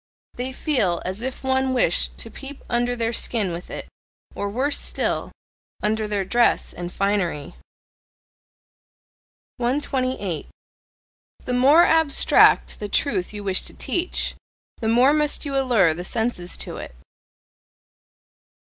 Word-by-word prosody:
They 250 Hz, +2 st, -4 dB
feel 245 Hz, -, +1 dB
as 190 Hz, +4 st, -3 dB
if 260 Hz, +2 st, -4 dB
one 265 Hz, 0 st, +1 dB
wished 180 Hz, -8 st, +2 dB
to 230 Hz, -, -8 dB
peep 275 Hz, 0 st, -10 dB
under 245 Hz, 0 st, 0 dB
their 230 Hz, 0 st, -1 dB
skin 215 Hz, -5 st, 0 dB
with 170 Hz, +1 st, -7 dB
it -, -, -6 dB, 0.5 s
or 200 Hz, -, -3 dB
worse 265 Hz, +7 st, 0 dB
still! -, -, -2 dB, 0.5 s
under 215 Hz, 0 st, 0 dB
their 205 Hz, -2 st, -1 dB
dress 240 Hz, +4 st, +2 dB
and 175 Hz, 0 st, -6 dB
finery. 195 Hz, -8 st, -1 dB, 2.0 s
128. 255 Hz, -, -1 dB, 1.0 s
The 250 Hz, -, -2 dB
more 280 Hz, +7 st, +6 dB
abstract 320 Hz, -3 st, +4 dB
the 210 Hz, -, -5 dB
truth 190 Hz, -6 st, 0 dB
you 210 Hz, -1 st, -7 dB
wish 190 Hz, -2 st, +1 dB
to -, -, -7 dB
teach, 355 Hz, +1 st, -2 dB, 0.4 s
the 225 Hz, -, -3 dB
more 245 Hz, +5 st, +5 dB
must 300 Hz, 0 st, +1 dB
you 280 Hz, -1 st, -3 dB
allure 240 Hz, -11 st, +3 dB
the 175 Hz, +3 st, -6 dB
senses 220 Hz, -3 st, -2 dB
to -, -, -5 dB
it. 65 Hz, -, -8 dB
240 Hz, 130 wpm, -23 LUFS, 195-265 Hz, 2.0 s, more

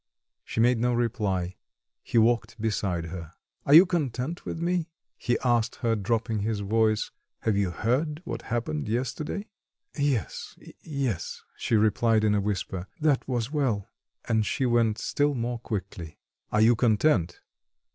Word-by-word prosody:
She -, -, -5 dB
made 120 Hz, +1 st, +4 dB
no 120 Hz, +1 st, +2 dB
reply; 100 Hz, -7 st, -1 dB, 0.4 s
he -, -, -2 dB
walked 115 Hz, 0 st, +2 dB
beside 100 Hz, -6 st, -1 dB
her. 85 Hz, -1 st, -7 dB, 0.3 s
"Are 140 Hz, -, +5 dB
you 175 Hz, +4 st, +10 dB
content 160 Hz, -3 st, -2 dB
with -, -, -4 dB
me?" 170 Hz, 0 st, 0 dB, 0.3 s
he 120 Hz, -1 st, 0 dB
asked 120 Hz, -2 st, +2 dB
her, 115 Hz, -2 st, 0 dB
dropping 110 Hz, +2 st, -1 dB
his 105 Hz, 0 st, -1 dB
voice. 110 Hz, +1 st, +1 dB, 0.3 s
"Have 110 Hz, -, +1 dB
you 100 Hz, -2 st, +1 dB
heard 130 Hz, -, 0 dB
what -, -, -4 dB
happened 105 Hz, -10 st, -2 dB
yesterday?" 135 Hz, -, -2 dB, 0.5 s
"Yes, 140 Hz, -, -2 dB, 0.2 s
yes," 135 Hz, -, -3 dB
she -, -, 0 dB
replied 110 Hz, +1 st, +3 dB
in 105 Hz, -1 st, +3 dB
a 105 Hz, -, +2 dB
whisper, 95 Hz, -2 st, -3 dB
"that 150 Hz, -3 st, +2 dB
was 120 Hz, -1 st, -1 dB
well." 130 Hz, -10 st, 0 dB, 0.4 s
And 110 Hz, -1 st, +2 dB
she 130 Hz, +5 st, -1 dB
went 115 Hz, -3 st, +2 dB
still 145 Hz, 0 st, 0 dB
more 120 Hz, 0 st, -2 dB
quickly. 95 Hz, -8 st, -5 dB, 0.3 s
"Are 105 Hz, -, +3 dB
you 115 Hz, +2 st, +6 dB
content?" 110 Hz, -, +2 dB
115 Hz, 145 wpm, -27 LUFS, 105-130 Hz, 0.5 s, you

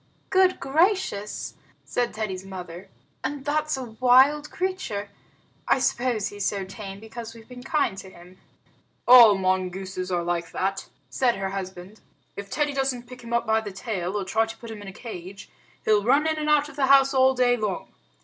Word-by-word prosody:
"Good 375 Hz, -1 st, +4 dB
gracious," 290 Hz, -, 0 dB, 0.3 s
said 245 Hz, -1 st, -1 dB
Teddy's 195 Hz, -4 st, -4 dB
mother, 185 Hz, -1 st, -9 dB, 0.3 s
"and 270 Hz, 0 st, -4 dB
that's 305 Hz, 0 st, 0 dB
a 260 Hz, -, -4 dB
wild 255 Hz, +6 st, +4 dB
creature! 345 Hz, -, -3 dB, 0.6 s
I -, -, +4 dB
suppose 240 Hz, -4 st, 0 dB
he's 205 Hz, -1 st, -6 dB
so 200 Hz, -2 st, -1 dB
tame 195 Hz, 0 st, -8 dB
because 225 Hz, +1 st, -9 dB
we've 225 Hz, -1 st, -14 dB
been 250 Hz, -1 st, -10 dB
kind 275 Hz, -5 st, 0 dB
to 190 Hz, -, -10 dB
him." 180 Hz, +1 st, -16 dB, 0.7 s
"All 235 Hz, -5 st, +9 dB
mongooses 185 Hz, 0 st, -2 dB
are 175 Hz, -1 st, 0 dB
like 170 Hz, -1 st, -3 dB
that," 195 Hz, +1 st, -2 dB, 0.2 s
said 250 Hz, -3 st, +2 dB
her 195 Hz, 0 st, -3 dB
husband. 190 Hz, +1 st, -7 dB, 0.3 s
"If 200 Hz, 0 st, -7 dB
Teddy 295 Hz, +3 st, 0 dB
doesn't 265 Hz, -3 st, -1 dB
pick 250 Hz, +1 st, -12 dB
him 235 Hz, -, -9 dB
up 235 Hz, 0 st, +1 dB
by 220 Hz, 0 st, +2 dB
the 205 Hz, -2 st, -7 dB
tail, 195 Hz, -2 st, -3 dB
or 195 Hz, -, -4 dB
try 220 Hz, +4 st, +1 dB
to 225 Hz, -, -9 dB
put 230 Hz, -1 st, -10 dB
him 215 Hz, -2 st, -8 dB
in 205 Hz, -, -10 dB
a -, -, -6 dB
cage, 195 Hz, -3 st, -9 dB, 0.3 s
he'll 210 Hz, -1 st, +3 dB
run 275 Hz, +7 st, +3 dB
in 315 Hz, -1 st, 0 dB
and 305 Hz, 0 st, -1 dB
out 295 Hz, -1 st, +4 dB
of 295 Hz, -1 st, -13 dB
the 270 Hz, -2 st, +2 dB
house 275 Hz, 0 st, +6 dB
all 265 Hz, 0 st, +4 dB
day 245 Hz, -1 st, +3 dB
long. 210 Hz, -5 st, -3 dB
225 Hz, 190 wpm, -25 LUFS, 195-265 Hz, 0.7 s, All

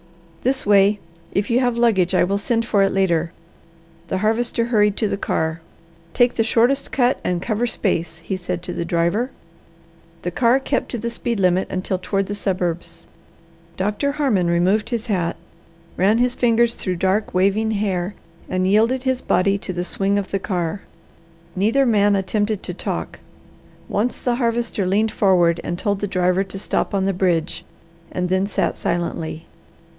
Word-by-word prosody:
"This 265 Hz, +2 st, 0 dB
way! 200 Hz, 0 st, +4 dB, 0.3 s
If 200 Hz, +3 st, -1 dB
you 240 Hz, -, +4 dB
have 245 Hz, -2 st, +1 dB
luggage, 190 Hz, -6 st, +3 dB
I -, -, +4 dB
will 200 Hz, +3 st, 0 dB
send 230 Hz, +2 st, 0 dB
for 205 Hz, -4 st, +2 dB
it 195 Hz, -, +3 dB
later." 170 Hz, -4 st, +1 dB, 0.8 s
The 190 Hz, -, -1 dB
Harvester 225 Hz, +3 st, 0 dB
hurried 210 Hz, -3 st, +2 dB
to 220 Hz, -, +1 dB
the 200 Hz, -, -1 dB
car. 160 Hz, -4 st, -2 dB, 0.5 s
"Take 245 Hz, 0 st, +4 dB
the 225 Hz, -, +1 dB
shortest 245 Hz, +5 st, +2 dB
cut 255 Hz, -1 st, +2 dB
and 180 Hz, -1 st, 0 dB
cover 230 Hz, +1 st, 0 dB
space," 170 Hz, -8 st, -1 dB
he 190 Hz, -, -2 dB
said 180 Hz, -1 st, -4 dB
to 180 Hz, -, -5 dB
the -, -, -2 dB
driver. 170 Hz, +8 st, 0 dB, 0.9 s
The 175 Hz, -, -2 dB
car 240 Hz, +6 st, +3 dB
kept 270 Hz, 0 st, -2 dB
to 240 Hz, -, -3 dB
the 235 Hz, +1 st, -3 dB
speed 235 Hz, -1 st, -2 dB
limit 185 Hz, 0 st, +2 dB
until 185 Hz, 0 st, -2 dB
toward 195 Hz, +1 st, -1 dB
the 205 Hz, -, -4 dB
suburbs. 180 Hz, -4 st, -3 dB, 0.7 s
Doctor 210 Hz, +9 st, -1 dB
Harmon 255 Hz, -, +1 dB
removed 180 Hz, +6 st, +2 dB
his 235 Hz, -2 st, -2 dB
hat, 180 Hz, -6 st, -1 dB, 0.6 s
ran 200 Hz, +4 st, +3 dB
his 245 Hz, +1 st, +2 dB
fingers 235 Hz, -1 st, +2 dB
through 185 Hz, -2 st, -3 dB
dark 190 Hz, +3 st, 0 dB
waving 200 Hz, +4 st, +2 dB
hair 200 Hz, -3 st, -1 dB, 0.3 s
and 185 Hz, 0 st, 0 dB
yielded 225 Hz, +6 st, +3 dB
his 260 Hz, -1 st, 0 dB
body 195 Hz, +2 st, +2 dB
to 190 Hz, -, -5 dB
the 175 Hz, -1 st, -3 dB
swing 195 Hz, +3 st, 0 dB
of 200 Hz, -2 st, -3 dB
the 195 Hz, -, 0 dB
car. 180 Hz, 0 st, -2 dB, 0.7 s
Neither 225 Hz, +8 st, +2 dB
man 205 Hz, -3 st, +3 dB
attempted 205 Hz, +2 st, -1 dB
to 180 Hz, -, -5 dB
talk. -, -, -4 dB, 0.7 s
Once 225 Hz, +5 st, -1 dB
the 240 Hz, -1 st, -1 dB
Harvester 235 Hz, -5 st, -1 dB
leaned 210 Hz, +4 st, +2 dB
forward 175 Hz, -4 st, +3 dB
and 175 Hz, -, -3 dB
told 200 Hz, +1 st, -1 dB
the 205 Hz, -, -2 dB
driver 185 Hz, 0 st, +1 dB
to 190 Hz, 0 st, -8 dB
stop 200 Hz, -, -1 dB
on 190 Hz, -1 st, +1 dB
the 195 Hz, -, +1 dB
bridge, 175 Hz, -3 st, 0 dB, 0.5 s
and 180 Hz, 0 st, -2 dB
then 190 Hz, +1 st, +1 dB
sat 205 Hz, -, -1 dB
silently. 165 Hz, -2 st, -3 dB
200 Hz, 170 wpm, -21 LUFS, 185-230 Hz, 0.9 s, way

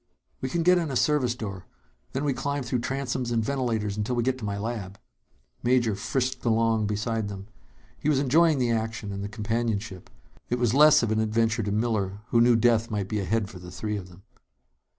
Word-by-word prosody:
"We 130 Hz, -, -2 dB
can 165 Hz, +5 st, 0 dB
get 180 Hz, +1 st, +5 dB
in 165 Hz, -3 st, -2 dB
a 135 Hz, -, -3 dB
service 130 Hz, -3 st, +2 dB
door. 100 Hz, -6 st, -7 dB, 0.5 s
Then 135 Hz, +3 st, -2 dB
we 145 Hz, -2 st, +1 dB
climb 140 Hz, +2 st, -2 dB
through 125 Hz, 0 st, -1 dB
transoms 130 Hz, -1 st, -2 dB
and 115 Hz, -2 st, 0 dB
ventilators 115 Hz, -6 st, -1 dB
until 105 Hz, +4 st, -1 dB
we 120 Hz, -, +1 dB
get 130 Hz, +1 st, 0 dB
to -, -, -10 dB
my 100 Hz, -1 st, -2 dB
lab." 100 Hz, -3 st, -4 dB, 0.6 s
Major 120 Hz, -3 st, +2 dB
frisked 130 Hz, +5 st, -2 dB
along 115 Hz, -2 st, +2 dB
beside 110 Hz, +1 st, -1 dB
them. 100 Hz, -1 st, -7 dB, 0.5 s
He 150 Hz, -, 0 dB
was 150 Hz, -, +3 dB
enjoying 150 Hz, +4 st, +4 dB
the 125 Hz, -2 st, +1 dB
action 110 Hz, -2 st, -2 dB
and 100 Hz, 0 st, -4 dB
the 100 Hz, -, -4 dB
companionship. 110 Hz, -3 st, -3 dB, 0.4 s
It 125 Hz, -, 0 dB
was 120 Hz, -2 st, +1 dB
less 150 Hz, -1 st, +7 dB
of 115 Hz, -, 0 dB
an 110 Hz, -, +1 dB
adventure 115 Hz, +1 st, +1 dB
to 100 Hz, -1 st, -2 dB
Miller, 105 Hz, -2 st, -1 dB
who 115 Hz, -, +4 dB
knew 120 Hz, 0 st, +5 dB
death 115 Hz, 0 st, +3 dB
might 100 Hz, -3 st, -2 dB
be 105 Hz, -, -1 dB
ahead 105 Hz, +2 st, 0 dB
for 95 Hz, -2 st, -11 dB
the 90 Hz, 0 st, -10 dB
three 105 Hz, +4 st, -4 dB
of 95 Hz, -3 st, -6 dB
them. 90 Hz, +2 st, -16 dB
115 Hz, 210 wpm, -26 LUFS, 105-125 Hz, 0.6 s, less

